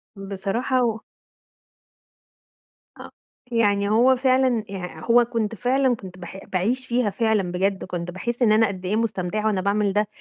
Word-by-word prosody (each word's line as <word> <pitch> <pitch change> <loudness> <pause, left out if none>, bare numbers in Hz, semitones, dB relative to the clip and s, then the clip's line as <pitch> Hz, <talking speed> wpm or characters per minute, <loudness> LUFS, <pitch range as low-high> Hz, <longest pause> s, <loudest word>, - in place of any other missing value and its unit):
بصراحة 200 +6 -1
و 225 -2 0 2.0
آ - - -10 0.4
يع 205 -3 +2
هو 240 +5 +4
فعلًا 255 -3 +2
يعني 180 -4 -7
هو 240 +1 +5
كنت 230 -2 -2
فعلًا 255 +3 +1
كنت 185 -4 -11
باح 180 +1 -9
باعيش 235 +8 -1
فيها 240 -2 +1
فعلًا 210 -3 0
بجد، 190 +2 -1
كنت 175 -1 -5
باحس 235 +7 -4
إن 230 -3 +4
أنا 220 +1 +4
قد 190 -2 -7
إيه 195 +3 0
مستمتعة 215 -2 -2
وأنا 200 -3 +1
باعمل 200 +1 +1
ده، 210 +1 +1
215 Hz, 155 wpm, -23 LUFS, 190-240 Hz, 2.0 s, هو